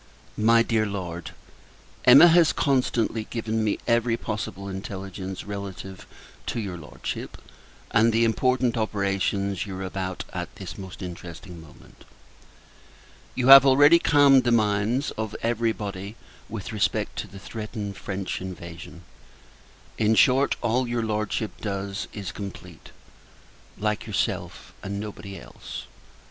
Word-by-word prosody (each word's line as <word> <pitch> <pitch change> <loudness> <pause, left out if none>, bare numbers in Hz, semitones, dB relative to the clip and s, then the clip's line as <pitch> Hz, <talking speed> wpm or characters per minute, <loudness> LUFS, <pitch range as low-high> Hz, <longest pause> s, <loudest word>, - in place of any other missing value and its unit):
MY 115 +2 +4
DEAR 110 -2 +1
LORD, 90 -4 -5 0.8
Emma 135 +6 +10
has 165 -2 +5
constantly 120 -5 0
given 110 -1 -2
me 105 - 0
every 115 -1 +2
possible 105 -3 -5
intelligence 95 -1 -6
relative 100 -2 -7 0.4
to - - -2
your 100 -5 -4
Lordship, 80 -4 -6 0.5
and 115 0 +4
the 115 +1 +3
important 125 +1 +1
operations 100 -2 -1
you 95 - -6
are 95 - -5
about 95 -1 -4
at - - -5
this 90 -2 -8
most 95 -1 -9
interesting 90 0 -9
moment. 80 -2 -17 1.3
You 130 0 +1
have 135 -1 +12
already 145 +5 +6
calmed 140 -4 +5
the 120 - +1
minds 110 +4 +1
of 110 -1 -3
every 115 0 +1
body 100 -1 -6 0.3
with 110 +1 -6
respect 100 -4 0
to - - -4
the 100 - -12
threatened 105 0 -6
French 95 -1 -4
invasion. 85 -1 -9 1.0
In 110 0 +3
short, 135 +4 +4
all 120 +2 +1
your 120 -1 -1
Lordship 110 0 -2
does 100 -1 -3
is 100 -4 -6
complete; 100 0 -9 0.9
like 105 +1 -2
yourself, 105 - -3
and 100 0 -4
nobody 100 -2 -7
else. - - -9
105 Hz, 130 wpm, -25 LUFS, 95-115 Hz, 1.3 s, have